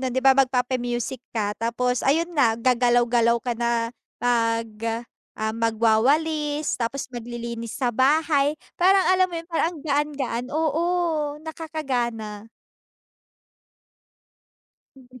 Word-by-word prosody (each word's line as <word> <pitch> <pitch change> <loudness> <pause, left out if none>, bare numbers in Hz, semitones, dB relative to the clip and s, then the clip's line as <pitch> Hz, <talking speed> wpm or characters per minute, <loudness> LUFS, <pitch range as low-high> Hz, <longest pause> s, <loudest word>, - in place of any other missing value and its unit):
nun 260 -1 -2
‘di 260 - 0
ba, 270 0 +6
magpapa-music 250 -1 0
ka, 210 -3 -1
tapos 245 +2 -1
ayun 325 +5 +2
na, 245 -6 +4
gagalaw 245 0 +3
galaw 235 0 +3
ka 245 - -2
na, 235 -1 0 0.3
mag 230 -1 +1 0.7
ah, 220 0 0
magwawalis, 285 +7 +1
tapos 250 +3 -3
maglilinis 235 -2 -6
sa 250 -3 0
bahay, 285 +3 +3 0.2
parang 380 +2 +4
alam 370 0 +5
mo 350 - -8
‘yon, 330 - -17
parang 330 -2 +1
ang 325 - -10
gaan-gaan. 285 -4 -1
Oo, 315 +1 +1 0.6
nakakagana. 245 -10 -4 2.5
Mm. 255 -1 -16
250 Hz, 115 wpm, -24 LUFS, 235-295 Hz, 2.5 s, ba